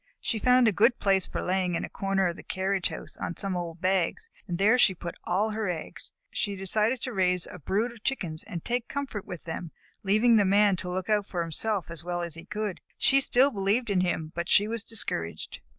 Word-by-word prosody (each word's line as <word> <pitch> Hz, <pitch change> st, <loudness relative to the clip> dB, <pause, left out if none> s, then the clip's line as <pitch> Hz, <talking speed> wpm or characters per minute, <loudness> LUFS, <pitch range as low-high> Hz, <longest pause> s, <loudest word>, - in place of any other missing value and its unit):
She 225 Hz, -, -2 dB
found 250 Hz, +1 st, +5 dB
a -, -, +5 dB
good 230 Hz, +5 st, +4 dB
place 195 Hz, -2 st, +2 dB
for -, -, -4 dB
laying, 180 Hz, -1 st, 0 dB
in -, -, -1 dB
a -, -, -8 dB
corner 195 Hz, -1 st, 0 dB
of 170 Hz, -, -2 dB
the -, -, -10 dB
carriage 190 Hz, 0 st, -1 dB
house -, -, -8 dB
on 170 Hz, -, -4 dB
some 195 Hz, -2 st, -1 dB
old 170 Hz, -1 st, -5 dB
bags, 190 Hz, -, 0 dB, 0.2 s
and 175 Hz, -2 st, -2 dB
there 215 Hz, +6 st, +4 dB
she 190 Hz, -6 st, +5 dB
put 170 Hz, 0 st, -6 dB
all 205 Hz, +5 st, +1 dB
her 215 Hz, -2 st, -2 dB
eggs. 165 Hz, -3 st, -6 dB, 0.2 s
She 205 Hz, -, -1 dB
had 195 Hz, -, -8 dB
decided 215 Hz, +6 st, +1 dB
to 255 Hz, -3 st, -4 dB
raise 180 Hz, -2 st, +2 dB
a 180 Hz, -, -9 dB
brood 205 Hz, -, 0 dB
of 230 Hz, -2 st, -15 dB
Chickens 175 Hz, -12 st, -1 dB
and 175 Hz, -7 st, -7 dB
take 245 Hz, 0 st, -1 dB
comfort 270 Hz, -8 st, -4 dB
with 175 Hz, -, -7 dB
them, 165 Hz, +1 st, -5 dB, 0.3 s
leaving 215 Hz, +4 st, +4 dB
the 205 Hz, -, +5 dB
Man 200 Hz, +1 st, +4 dB
to 180 Hz, -, -3 dB
look 180 Hz, 0 st, -3 dB
out 210 Hz, -2 st, +1 dB
for 175 Hz, -2 st, -2 dB
himself 185 Hz, +3 st, -1 dB
as 165 Hz, -1 st, -5 dB
well 175 Hz, 0 st, -2 dB
as 170 Hz, -2 st, -4 dB
he 165 Hz, +1 st, -8 dB
could. 210 Hz, -1 st, -4 dB, 0.2 s
She 275 Hz, 0 st, +4 dB
still 270 Hz, +1 st, +4 dB
believed 205 Hz, +2 st, 0 dB
in 185 Hz, -2 st, +3 dB
him, 165 Hz, -3 st, -1 dB
but 170 Hz, 0 st, -3 dB
she 205 Hz, -, +5 dB
was 230 Hz, 0 st, -3 dB
discouraged. 85 Hz, -, -4 dB
195 Hz, 230 wpm, -28 LUFS, 175-220 Hz, 0.3 s, found